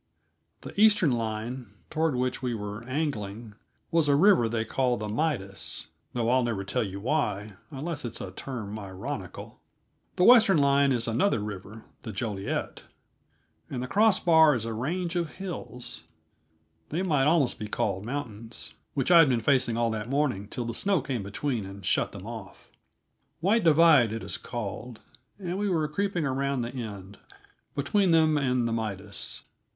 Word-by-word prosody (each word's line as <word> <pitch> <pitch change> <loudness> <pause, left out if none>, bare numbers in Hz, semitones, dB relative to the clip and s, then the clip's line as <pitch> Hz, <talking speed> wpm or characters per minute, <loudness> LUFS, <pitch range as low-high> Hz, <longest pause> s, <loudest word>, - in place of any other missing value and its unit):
The - - -9
eastern 205 -8 +5
line, 115 0 -3 0.2
toward 160 -2 +1
which 125 +1 -1
we 125 -2 -1
were 105 +1 -6
angling, 115 -7 -3 0.4
was 165 -3 +3
a 140 - +5
river 165 - +5
they 110 -1 -1
call 125 -1 +1
the 105 - -4
Midas 105 -5 -3 0.2
though 120 -2 0
I'll 130 0 +4
never 115 -5 -1
tell 100 +6 -1
you 100 -3 -4
why, 105 -4 -1 0.2
unless 150 +2 -5
it's 120 - -5
a 95 - -6
term 110 -1 -6
ironical. 95 -2 -7 0.5
The 180 - +2
western 220 -5 +7
line 140 -1 +4
is 120 -3 0
another 115 - +2
river, 105 +1 -7 0.2
the 110 - -6
Joliette, 100 -2 -3 0.9
and 125 -2 -3
the - - -4
cross 210 - +4
bar 160 -4 +6
is 115 -2 -3
a 115 - -3
range 170 +10 -2
of 170 -3 -1
hills 175 -10 -7 0.8
they 170 +5 -1
might 150 -6 +2
almost 155 -5 +2
be 105 - -4
called 95 -2 -1
mountains 115 -3 -5 0.2
which 140 +5 +1
I 170 - +9
had 160 -4 +7
been 125 -3 +2
facing 125 -1 +2
all 115 -1 +1
that 110 +1 -4
morning 130 -8 0
till 120 +3 -4
the 115 - -3
snow 195 - +1
came 130 -4 -3
between 110 +4 -2
and 95 0 -9
shut - - +1
them - - -9
off; - - -9 0.7
White 205 +7 +2
Divide, 155 -7 +6
it 115 - -4
is - - -3
called, 120 0 -6 0.4
and 185 -1 -4
we 205 0 0
were 160 -4 +1
creeping 180 +1 -1
around 135 -1 0
the 120 - -5
end, 100 -5 -7 0.6
between 190 +7 +2
them 160 -2 +4
and 125 -4 +1
the 115 - -1
Midas. 110 -4 -4
125 Hz, 165 wpm, -28 LUFS, 110-155 Hz, 0.9 s, I